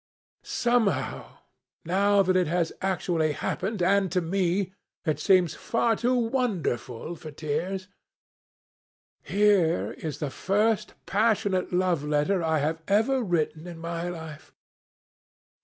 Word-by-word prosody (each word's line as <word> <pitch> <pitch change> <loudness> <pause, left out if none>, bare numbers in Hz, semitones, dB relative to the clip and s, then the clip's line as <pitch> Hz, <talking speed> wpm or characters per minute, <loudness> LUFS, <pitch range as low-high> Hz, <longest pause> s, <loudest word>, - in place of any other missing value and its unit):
Somehow, 220 - 0 0.5
now 200 +3 +3
that 185 0 +1
it 185 -3 +3
has 170 0 0
happened 170 -5 0
actually, 195 0 -2 0.2
and 190 -4 -3
to 180 - +2
me, 185 +2 0 0.3
it 155 -3 0
seems 180 -5 +4
far 230 0 0
too 245 +3 +1
wonderful 190 - -1
for 155 - -9
tears. 165 +6 -3 1.3
Here 200 -5 +2
is 155 -3 -4
the 150 -3 -3
first 210 +4 0
passionate 205 -3 +1
love 180 -4 +1
letter 150 +6 +1
I 160 -1 +1
have 155 +2 -1
ever 225 +7 +2
written 170 -4 -1
in 170 -1 -8
my 170 +1 -4
life. 160 -3 -9
180 Hz, 120 wpm, -27 LUFS, 160-205 Hz, 1.3 s, seems